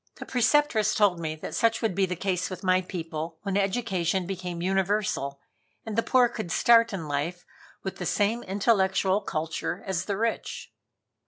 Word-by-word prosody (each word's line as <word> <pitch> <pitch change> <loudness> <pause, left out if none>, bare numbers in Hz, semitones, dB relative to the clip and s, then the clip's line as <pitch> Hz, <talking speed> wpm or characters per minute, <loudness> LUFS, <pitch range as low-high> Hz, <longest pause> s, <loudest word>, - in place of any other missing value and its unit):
The - - -8
Preceptress 245 -3 +2
told 200 -5 +3
me 155 -1 -3
that 155 - -7
such 230 0 +1
would 220 - +1
be 190 +1 +1
the 180 - -3
case 180 0 -1
with 185 - -7
my 185 0 +3
people 165 -3 -5
when 195 -2 -2
education 190 -3 0
became 180 -2 -5
universal 190 -6 0 0.5
and 220 -2 -4
the 230 - +3
poor 250 +1 +4
could 220 -7 -6
start 230 +3 +5
in 175 -6 -4
life 150 +5 -3 0.4
with 190 0 -4
the 180 - -3
same 215 +4 +1
intellectual 195 -1 +2
culture 160 +2 -3
as 190 -3 -2
the 200 -2 -2
rich. 230 +1 -3
190 Hz, 170 wpm, -27 LUFS, 175-215 Hz, 0.5 s, start